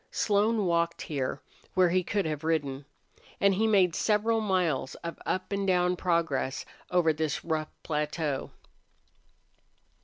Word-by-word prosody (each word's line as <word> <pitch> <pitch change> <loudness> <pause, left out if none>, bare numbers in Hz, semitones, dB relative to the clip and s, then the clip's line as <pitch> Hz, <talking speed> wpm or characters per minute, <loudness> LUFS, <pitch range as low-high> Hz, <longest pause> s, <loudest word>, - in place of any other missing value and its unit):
Slone 210 0 +2
walked 170 -1 0
here, 135 -4 -3 0.3
where 185 -1 +5
he 185 +1 +2
could 200 +1 -1
have 155 -1 -3
ridden. 145 -4 -1 0.5
And 200 0 +4
he 220 +4 +2
made 190 -5 +4
several 220 +3 +2
miles 180 -10 0
of 170 - -5
up 185 +2 -2
and 200 0 -1
down 180 -1 +3
progress 165 -7 0 0.2
over 175 -3 +3
this 155 0 -2
rough 155 -2 -1
plateau. 150 -2 -2
170 Hz, 130 wpm, -29 LUFS, 155-195 Hz, 0.5 s, where